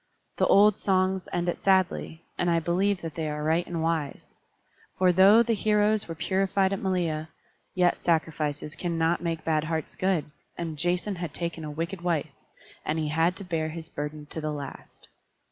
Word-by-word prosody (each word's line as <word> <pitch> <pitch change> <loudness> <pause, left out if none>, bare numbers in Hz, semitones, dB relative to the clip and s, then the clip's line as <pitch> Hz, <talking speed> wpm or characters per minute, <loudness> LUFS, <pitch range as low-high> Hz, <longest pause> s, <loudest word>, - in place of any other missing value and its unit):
The - - +3
old 205 0 +5
songs 190 -1 +1
end 175 0 -1
it 175 - -1
sadly, 185 -3 +1
and 175 - 0
I 170 -1 +3
believe 185 +4 +1
that 165 -2 -5
they 160 -1 -3
are 150 0 -4
right 160 +3 +1
and 165 -2 -3
wise; 160 -4 -2 0.7
for 185 -1 +4
though 195 +6 +7
the 235 0 +1
heroes 210 0 +2
were 165 - -5
purified 190 +2 +1
at 195 - -2
Malea, 170 -5 -1 0.5
yet 180 -1 +3
sacrifices 155 -3 -1
cannot 165 0 0
make 165 -2 -2
bad 155 -1 +1
hearts 160 -1 -3
good, 185 -6 0 0.3
and 165 -2 -4
Jason 175 +5 -1
had 170 -3 -5
taken 170 -2 -4
a 150 - -5
wicked 170 +5 -4
wife, 170 -4 -1 0.5
and 155 - -1
he 155 -1 -1
had 165 +4 +2
to 200 - -8
bear 165 -4 -2
his 160 0 -6
burden 150 +1 -5
to 160 - -4
the 155 0 -2
last. 145 -2 -8
170 Hz, 180 wpm, -27 LUFS, 160-185 Hz, 0.7 s, though